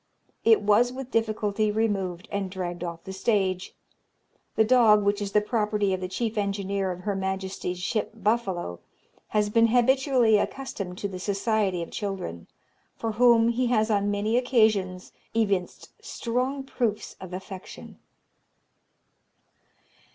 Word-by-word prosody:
It 225 Hz, -1 st, +5 dB
was 215 Hz, +4 st, +4 dB
with 260 Hz, 0 st, -7 dB
difficulty 215 Hz, -2 st, 0 dB
removed, 200 Hz, -3 st, -1 dB
and 200 Hz, -2 st, -2 dB
dragged 175 Hz, -2 st, -5 dB
off 170 Hz, -1 st, -6 dB
the 190 Hz, -, -7 dB
stage. 190 Hz, -2 st, 0 dB, 0.8 s
The 220 Hz, -, +5 dB
dog, 220 Hz, -3 st, +5 dB
which 205 Hz, +1 st, +1 dB
is 200 Hz, -1 st, -3 dB
the 210 Hz, -, +5 dB
property 210 Hz, -3 st, 0 dB
of 185 Hz, -, -3 dB
the 185 Hz, -, -2 dB
chief 220 Hz, +3 st, -2 dB
engineer 200 Hz, -1 st, -1 dB
of 180 Hz, 0 st, -5 dB
Her 200 Hz, +1 st, -2 dB
Majesty's 190 Hz, -1 st, -3 dB
ship 205 Hz, +4 st, -1 dB
Buffalo, 200 Hz, -, -1 dB, 0.5 s
has 210 Hz, -1 st, 0 dB
been 230 Hz, +1 st, +5 dB
habitually 245 Hz, -2 st, +3 dB
accustomed 200 Hz, -9 st, -4 dB
to 200 Hz, -, -2 dB
the 185 Hz, -2 st, -7 dB
society 200 Hz, -2 st, 0 dB
of -, -, -10 dB
children, 190 Hz, -, -5 dB, 0.5 s
for 225 Hz, -, -3 dB
whom 230 Hz, 0 st, +5 dB
he 245 Hz, +1 st, +1 dB
has 220 Hz, -2 st, +2 dB
on 205 Hz, -1 st, +1 dB
many 205 Hz, +3 st, 0 dB
occasions 215 Hz, -7 st, +1 dB, 0.2 s
evinced 200 Hz, -5 st, -1 dB
strong 255 Hz, +4 st, -2 dB
proofs 235 Hz, -5 st, -2 dB
of 185 Hz, -1 st, -8 dB
affection. 190 Hz, +1 st, -9 dB
205 Hz, 135 wpm, -26 LUFS, 190-230 Hz, 0.8 s, It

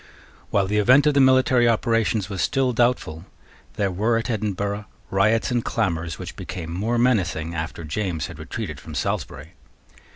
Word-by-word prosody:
While 100 Hz, -1 st, +2 dB
the 105 Hz, +2 st, 0 dB
event 130 Hz, +7 st, +5 dB
of 150 Hz, -, +4 dB
the 140 Hz, -, +3 dB
military 130 Hz, -2 st, +5 dB
operations 115 Hz, -3 st, +1 dB
was 100 Hz, -4 st, -4 dB
still 130 Hz, -2 st, +1 dB
doubtful, 115 Hz, -9 st, 0 dB, 0.5 s
there 100 Hz, -2 st, 0 dB
were 110 Hz, +6 st, +1 dB
at 115 Hz, +2 st, -2 dB
Edinburgh 100 Hz, -1 st, -2 dB, 0.3 s
riots 110 Hz, +6 st, +2 dB
and 120 Hz, -2 st, 0 dB
clamours 85 Hz, -7 st, -1 dB
which -, -, -8 dB
became 80 Hz, -2 st, -6 dB
more 110 Hz, +7 st, -1 dB
menacing 90 Hz, -10 st, +1 dB
after 80 Hz, +1 st, -5 dB
James 80 Hz, -1 st, -2 dB
had 80 Hz, -3 st, -9 dB
retreated 80 Hz, -, -6 dB
from -, -, -10 dB
Salisbury. -, -, -3 dB
105 Hz, 160 wpm, -23 LUFS, 85-120 Hz, 0.5 s, event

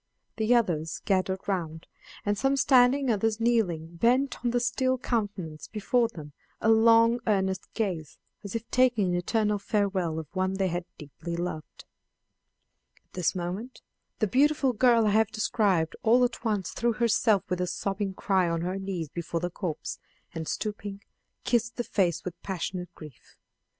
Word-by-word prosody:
The 225 Hz, +2 st, +3 dB
others 165 Hz, -9 st, 0 dB
gathered 190 Hz, -1 st, 0 dB
round, 165 Hz, -5 st, -3 dB, 0.4 s
and 205 Hz, 0 st, +1 dB
some 270 Hz, +6 st, +1 dB
standing, 260 Hz, 0 st, +4 dB
others 220 Hz, +1 st, 0 dB
kneeling, 175 Hz, -9 st, 0 dB
bent 250 Hz, +8 st, +2 dB
on 240 Hz, -, +2 dB
the 245 Hz, +1 st, +1 dB
still 255 Hz, +2 st, +1 dB
countenance 200 Hz, -11 st, -3 dB
before 230 Hz, +3 st, +1 dB
them 155 Hz, -10 st, -11 dB, 0.3 s
a 220 Hz, -, +1 dB
long 230 Hz, +1 st, +5 dB
earnest 190 Hz, -3 st, 0 dB
gaze, 180 Hz, -9 st, -3 dB, 0.3 s
as 200 Hz, +2 st, -6 dB
if 230 Hz, 0 st, -4 dB
taking 245 Hz, -6 st, +3 dB
an -, -, 0 dB
eternal 210 Hz, +3 st, 0 dB
farewell 195 Hz, -5 st, 0 dB
of 160 Hz, -, -4 dB
one 185 Hz, 0 st, 0 dB
they 190 Hz, -1 st, 0 dB
had 175 Hz, 0 st, -3 dB
deeply 155 Hz, +3 st, -7 dB
loved. 170 Hz, -3 st, -5 dB, 1.2 s
At -, -, -42 dB
this 180 Hz, -1 st, 0 dB
moment 185 Hz, +8 st, -5 dB, 0.3 s
the 215 Hz, -, +1 dB
the 195 Hz, -, -6 dB
beautiful 275 Hz, 0 st, +3 dB
girl 235 Hz, -1 st, +4 dB
I 210 Hz, -, +3 dB
have 220 Hz, +1 st, +4 dB
described 200 Hz, -7 st, +1 dB
all 240 Hz, +3 st, +4 dB
at 240 Hz, -, -4 dB
once 210 Hz, -5 st, -1 dB
threw 235 Hz, 0 st, 0 dB
herself 220 Hz, -3 st, +2 dB
with 180 Hz, 0 st, -2 dB
a 180 Hz, -, 0 dB
sobbing 195 Hz, +1 st, -3 dB
cry 190 Hz, -3 st, +1 dB
on 165 Hz, 0 st, -1 dB
her 185 Hz, +3 st, -2 dB
knees 190 Hz, -4 st, -4 dB
before 170 Hz, +1 st, -3 dB
the 175 Hz, -, -2 dB
corpse, 165 Hz, -4 st, -4 dB, 0.3 s
and, 160 Hz, -2 st, -5 dB
stooping, 205 Hz, -1 st, -4 dB, 0.4 s
kissed 235 Hz, -1 st, 0 dB
the 240 Hz, -, -2 dB
face 180 Hz, -7 st, 0 dB
with 175 Hz, -2 st, -7 dB
passionate 180 Hz, -1 st, -4 dB
grief. 150 Hz, -6 st, -14 dB
200 Hz, 165 wpm, -27 LUFS, 175-230 Hz, 1.2 s, long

